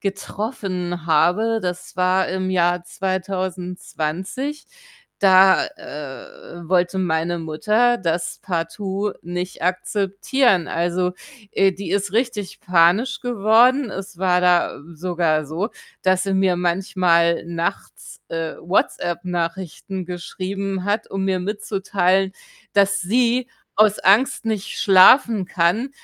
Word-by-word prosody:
getroffen 195 -4 -4
habe, 180 +9 +2
das 180 -1 -5
war 185 +1 +2
im 185 0 -2
Jahr 175 -1 +1
2020, 185 - -4 0.5
da, 190 -1 +5
äh, 150 +4 -10
wollte 180 +1 +1
meine 170 -1 0
Mutter 215 +10 +1
das 170 -1 -2
partout 190 +3 -3
nicht 180 +1 -5
akzeptieren. 195 +3 +1
Also, 175 +2 -1 0.4
äh, 195 -1 +3
die 185 -2 -7
ist 200 -1 -1
richtig 230 -5 -2
panisch 180 +8 +3
geworden. 240 +2 +3
Es 195 -1 -7
war 180 0 +2
da, 180 -1 +2
äh, - - -13
sogar 165 -2 0
so, 165 +9 -3 0.3
dass 185 0 +2
sie 195 0 -2
mir 190 -2 +2
manchmal 175 -1 +1
nachts, 170 0 -5
äh, 165 -1 -4
WhatsApp-Nachrichten 175 +1 -2
geschrieben 190 +2 -4
hat, 205 +2 -1
um 195 0 -2
mir 190 -1 +1
mitzuteilen, 195 -1 0 0.4
dass 200 -1 +2
sie 245 +5 +1 0.3
aus 215 -1 +4
Angst 225 +4 +3
nicht 215 -3 -3
schlafen 200 +2 +6
kann, 190 +9 0
185 Hz, 110 wpm, -21 LUFS, 175-200 Hz, 0.5 s, schlafen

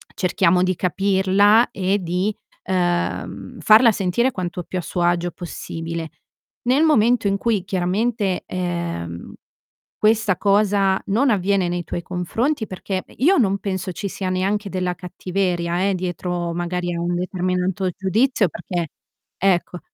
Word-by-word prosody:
cerchiamo 180 -1 +2
di 185 -1 +1
capirla 195 +5 +3
e 195 +1 0
di, 180 +4 -1 0.3
ehm, 175 -2 -2
farla 225 +2 +7
sentire 205 +7 +1
quanto 180 -2 -4
più 185 - -5
a - - -3
suo 175 +1 -3
agio 175 0 +1
possibile. 165 -1 -6 0.6
Nel 265 +5 +3
momento 240 -7 +3
in 200 0 +1
cui, 215 -4 0
chiaramente, 195 +1 0
ehm, 170 - -4 0.6
questa 215 -3 +3
cosa 200 -1 +2
non 245 +7 +2
avviene 195 -2 +1
nei 175 0 -2
tuoi 175 - -4
confronti 220 - -1
perché 185 0 -4
i 255 - -8
io 380 +1 +5
non 200 -4 +2
penso 190 -1 -3
ci 200 0 -4
sia 185 0 -4
neanche 200 +2 -1
della 180 -1 -1
cattiveria 180 0 -1
eh, 195 - +1
dietro 175 -1 -3
magari 175 0 -2
a 170 - -3
un 175 0 -1
determinato 185 +1 -1
giudizio 210 +3 +1
perché 175 -1 -4 0.5
ecco 180 -2 +1
185 Hz, 140 wpm, -21 LUFS, 175-205 Hz, 0.6 s, farla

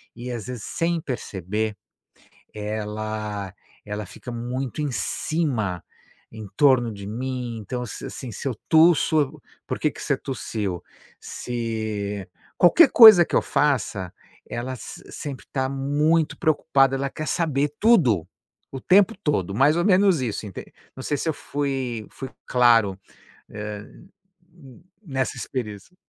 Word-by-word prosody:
e, 125 +1 -7
às 115 -4 -5
vezes, 125 -4 -6
sem 165 0 -1
perceber, 105 - -3 0.8
ela 105 -1 -4 0.3
ela 105 0 -5
fica 125 - -10
muito 125 +4 -4
em 145 - -1
cima, 120 - -1 0.5
em 110 -1 -9
torno 130 -6 +4
de 100 -1 -9
mim, 125 +1 -4
então, 125 +4 -4
se, - - -8
assim, 130 -3 -7
se 110 - -7
eu 130 - 0
tusso 160 -3 +4 0.3
"Por - - -3
que - - +2
que - - -12
você - - +1
tossiu?" 105 -8 -4 0.4
Se 110 -5 -4 0.3
qualquer 270 - +7
coisa 215 -7 +10
que - - -7
eu - - +5
faça, 105 -10 0 0.4
ela 125 +2 -4
s - - -9
sempre 140 -4 -7
tá 130 -1 0
muito 145 +4 +1
preocupada, 135 -3 +3
ela 140 +1 -1
quer 155 - -6
saber 150 -4 0
tudo, 130 - +4 0.4
o 135 - -6
tempo 195 0 +4
todo, 100 - 0
mais 140 +6 +4
ou 175 - +2
menos 190 -5 +4
isso, 110 -3 -3
enten 95 - -8 0.3
não 130 - -8
sei 145 - -1
se 160 - -3
eu - - -4
fui 135 -6 -3
fui 135 -1 -7 0.2
claro, 115 -6 +4 0.5
hã, 105 -1 -6 0.6
hum, 165 -7 -17
n - - -27 0.3
nessa 130 -1 -1
experiência. 120 - -6
125 Hz, 145 wpm, -24 LUFS, 105-145 Hz, 0.8 s, coisa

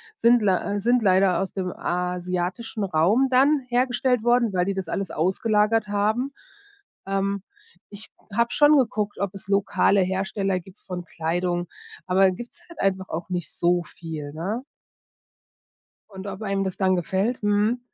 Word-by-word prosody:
sind 240 - +4
lei 200 0 +1
äh, - - -1
sind 240 +3 +3
leider 190 -3 +3
aus 195 - -4
dem 185 -2 -3
asiatischen 180 +5 -3
Raum 195 +9 +3
dann 275 +3 +4
hergestellt 250 -1 +1
worden, 240 -2 +3
weil 180 -1 +1
die 195 - -1
das 190 -3 -4
alles 195 -1 -2
ausgelagert 210 +5 +1
haben. 215 +7 0 0.7
Ähm, 195 0 -1 0.5
ich 205 +1 -8 0.2
habe 235 +2 +1
schon 295 0 +5
geguckt, 215 -5 0
ob 200 -1 -2
es 195 - -8
lokale 200 0 +3
Hersteller 190 0 -1
gibt 190 +3 -17
von 180 -2 -6
Kleidung, 175 +2 -2 0.4
aber 185 +2 +3
da - - +6
gibt's 240 - -9
halt 340 - -13
einfach 190 -1 0
auch 165 +3 -5
nicht 175 -4 -3
so 175 0 +2
viel, 155 -4 -8
ne? 200 - -3 1.5
Und 190 0 -9
ob 200 +1 -6
einem 195 -1 -1
das 190 -1 -4
dann 185 -1 +2
gefällt. 190 +8 -1
Mhm. 210 +4 +2
195 Hz, 155 wpm, -24 LUFS, 180-225 Hz, 1.5 s, da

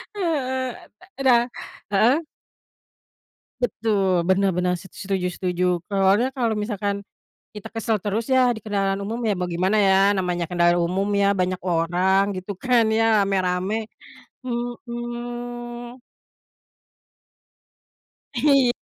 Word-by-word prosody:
Heeh, 260 -9 -1
e - - -17 0.3
e 275 - -2
dah 240 -2 +5 0.5
heeh? 230 +9 +4 1.4
Betul, 200 -6 +1
bener 195 +1 +3
bener, 180 0 +1
s 175 - -13 0.2
setuju 190 -2 -1
setuju. 180 -1 -2 0.3
Soalnya 200 +4 +3
kalau 230 -3 +1
misalkan 205 -2 -2 0.6
kita 210 - -8
kesel 225 -1 0
terus 210 +2 -1
ya 260 - +5 0.2
di 220 - -8
kendaraan 195 -2 0
umum 230 +4 -4
ya 205 - +2
bagaimana 180 +3 0
ya, 190 - +5 0.2
namanya 180 -2 -1
kendaraan 175 0 +3
umum 195 +3 -1
ya, - - +4
banyak 180 0 -1
orang 180 +4 +2
gitu 185 +2 -5
kan 245 -3 +4
ya, 225 - +3 0.2
rame-rame. 190 0 0 0.7
Hmm. 240 0 -6 2.3
Iya, 270 -1 +4
205 Hz, 115 wpm, -23 LUFS, 185-240 Hz, 2.3 s, dah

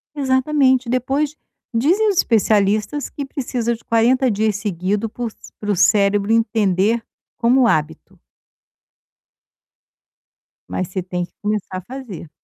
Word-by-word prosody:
Exatamente. 260 -2 +2
Depois, 275 +4 0 0.4
dizem 360 - +3
os 385 - -1
especialistas 215 +4 +2
que 285 - -6
precisa 245 -3 -2
de 230 - -17
40 245 +3 +2
dias 210 0 0
seguido 205 +2 -2
por 235 0 -5
c - - -27 0.2
para 210 -1 -2
o - - +1
cérebro 200 +2 +3
entender 220 -1 +2 0.3
como 245 +1 +4
hábito. 155 -4 -2 2.5
Mas 185 - -3
você 185 0 -3
tem 180 0 -3
que - - -28
começar 205 -3 -2
a - - -5
fazer. 225 - -9
225 Hz, 125 wpm, -20 LUFS, 200-260 Hz, 2.5 s, como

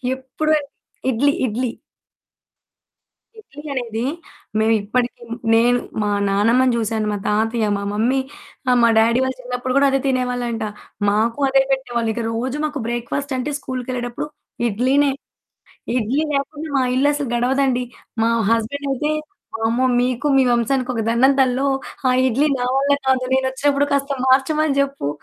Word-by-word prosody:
ఎప్పుడు 265 +4 -2 0.6
ఇడ్లీ 280 +4 +2
ఇడ్లీ. 245 +3 -1 1.7
ఇడ్లీ 295 -8 -12
అనేది, 235 -3 -3 0.6
మేమిప్పటికి, 225 +3 0 0.3
నేను 240 +2 +4 0.2
మా 210 - 0 0.2
నానమ్మని 235 +5 +3
చూశాను, 220 -1 -1
మా 205 - -1
తాతయ్య, 220 +1 +1
మా 200 - -4
మమ్మీ, 240 +6 +1 0.5
ఆ! - - +5
మా 235 - +6
డ్యాడీ 230 +2 +4
వాళ్ళు 260 0 -2
చిన్నప్పుడు 250 +1 -3
కూడా 280 0 +5
అదే 270 - +2
తినేవాళ్ళంట. 245 -3 -1 0.5
మాకు 225 +5 +1
అదే 270 0 +4
పెట్టేవాళ్ళు. 240 -4 -1
ఇక 235 +1 -3
రోజు 255 +5 -2
మాకు 295 -2 -3
బ్రేక్ఫాస్టంటే 260 +3 -3
స్కూలు‌కెళ్ళేటప్పుడు 250 +1 -4 0.4
ఇడ్లీనే. 265 +6 +2 0.9
ఇడ్లీ 250 +5 0
లేకుండా 295 +3 -3
మా 265 - +3
ఇల్లు 270 +3 +3
అసలు 290 -2 -3
గడవదండి. 250 +1 +1 0.4
మా 230 - +3 0.2
హస్బెండ్ 230 +5 -1
అయితే 295 +3 -1 0.5
"వామ్మో 230 +3 0 0.2
మీకు 250 +3 -1
మీ - - +6
వంశానికి 250 +2 0
ఒక 225 - -1
దండం 255 +4 +4
తల్లో! 260 +1 +2 0.4
ఆ - - +4 0.2
ఇడ్లీ 275 +5 +2
నా 245 - -1
వల్ల 280 +1 +1 0.2
కాదు, 260 -1 +3
నేనోచ్చినప్పుడు 275 +2 +1
కాస్త 280 0 0
మార్చమని 280 +2 +3
చెప్పు" 275 - -1
255 Hz, 135 wpm, -20 LUFS, 230-275 Hz, 1.7 s, మా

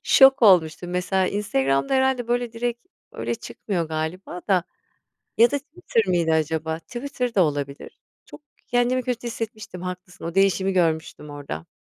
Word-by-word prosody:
şok 270 -2 +6
olmuştum. 175 -3 +4
Mesela 185 +1 +1
Instagram'da 135 - 0
herhâlde, 260 -2 +1
böyle, 240 -1 0
direkt 240 +4 -3 0.3
öyle - - -3
çıkmıyor 185 -7 -4
galiba 160 +3 -4
da 180 -3 +3 0.7
ya 235 +1 +7
da 285 - 0
Twitter 290 - -1
mıydı 170 -3 +1
acaba? 160 0 0
Twitter 250 - -4
da 190 - +5
olabilir. 145 -2 -3 0.3
Çok, - - -12 0.3
kendimi 245 +1 +1
kötü 245 -1 -3
hissetmiştim, 215 -5 -6
haklısın 180 -1 -7
o 170 +1 -4
değişimi 195 0 +3
görmüştüm 160 -4 0
orada. 140 - -7
190 Hz, 140 wpm, -24 LUFS, 160-240 Hz, 0.7 s, ya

